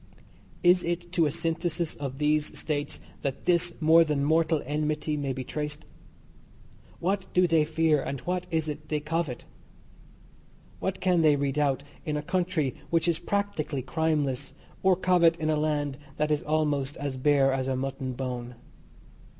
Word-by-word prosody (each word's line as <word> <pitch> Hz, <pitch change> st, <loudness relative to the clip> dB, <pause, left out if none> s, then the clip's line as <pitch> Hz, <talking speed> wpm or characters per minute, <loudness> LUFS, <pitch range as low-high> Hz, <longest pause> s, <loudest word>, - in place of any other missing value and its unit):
Is 180 Hz, 0 st, +5 dB
it 175 Hz, 0 st, -3 dB
to 170 Hz, -3 st, +3 dB
a -, -, -1 dB
synthesis 165 Hz, 0 st, -1 dB
of 135 Hz, -2 st, -5 dB
these 150 Hz, +1 st, +1 dB
states 145 Hz, -2 st, -3 dB, 0.2 s
that 135 Hz, -2 st, -4 dB
this 175 Hz, -1 st, +2 dB
more 160 Hz, +1 st, +6 dB
than 150 Hz, -3 st, 0 dB
mortal 160 Hz, +1 st, +2 dB
enmity 150 Hz, +1 st, -1 dB
may 140 Hz, -2 st, -2 dB
be 130 Hz, 0 st, -4 dB
traced? 150 Hz, +2 st, -5 dB, 1.1 s
What 190 Hz, +2 st, -1 dB
do 180 Hz, 0 st, +5 dB
they 160 Hz, -3 st, +3 dB
fear, 160 Hz, -2 st, +2 dB
and 140 Hz, 0 st, -4 dB
what 180 Hz, 0 st, -2 dB
is 160 Hz, -2 st, 0 dB
it 150 Hz, 0 st, -6 dB
they 150 Hz, -, 0 dB
covet? 150 Hz, -3 st, -3 dB, 1.3 s
What 190 Hz, 0 st, -3 dB
can 180 Hz, -2 st, +3 dB
they 155 Hz, -2 st, +5 dB
redoubt 140 Hz, -1 st, 0 dB, 0.2 s
in 150 Hz, -3 st, -2 dB
a 150 Hz, -, -3 dB
country 175 Hz, -6 st, 0 dB, 0.2 s
which 165 Hz, 0 st, +1 dB
is 170 Hz, -2 st, +1 dB
practically 170 Hz, -9 st, -2 dB
crimeless, 145 Hz, -3 st, -1 dB, 0.3 s
or 190 Hz, -1 st, +4 dB
covet 175 Hz, -2 st, +4 dB
in 155 Hz, -1 st, 0 dB
a -, -, +2 dB
land 145 Hz, -2 st, -1 dB, 0.2 s
that 150 Hz, 0 st, 0 dB
is 150 Hz, -, +2 dB
almost 150 Hz, -3 st, 0 dB
as 140 Hz, -2 st, -3 dB
bare 135 Hz, 0 st, +3 dB
as 130 Hz, -1 st, -1 dB
a 135 Hz, -, 0 dB
mutton 135 Hz, 0 st, -3 dB
bone? 125 Hz, -1 st, -5 dB
155 Hz, 160 wpm, -27 LUFS, 140-165 Hz, 1.3 s, more